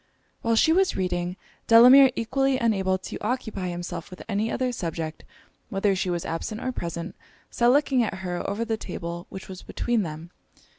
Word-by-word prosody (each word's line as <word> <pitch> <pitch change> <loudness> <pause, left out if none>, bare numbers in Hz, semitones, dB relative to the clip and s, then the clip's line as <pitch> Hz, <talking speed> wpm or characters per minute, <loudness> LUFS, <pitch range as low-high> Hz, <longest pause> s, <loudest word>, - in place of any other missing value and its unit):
While 230 0 +1
she 315 +8 +4
was 380 +2 +2
reading, 180 -1 -2 0.3
Delamere, 250 +4 +9
equally 270 +3 +1
unable 195 -6 +1
to 185 - -7
occupy 220 -5 -2
himself 175 -1 -5
with 185 - -10
any 220 +1 -1
other 255 -1 0
object 165 -2 -4 0.5
whether 195 0 +1
she 185 0 -1
was 175 -1 -2
absent 190 +7 -4
or 255 - -2
present, 170 -4 -5 0.4
sat 240 - +2
looking 270 0 +4
at 225 - -1
her 180 -2 -4
over 210 +3 -2
the 225 -1 -1
table 170 -3 -6
which 190 - -9
was 185 -1 -9
between 240 -2 -1
them. 165 -1 -6
195 Hz, 175 wpm, -25 LUFS, 175-235 Hz, 0.5 s, Delamere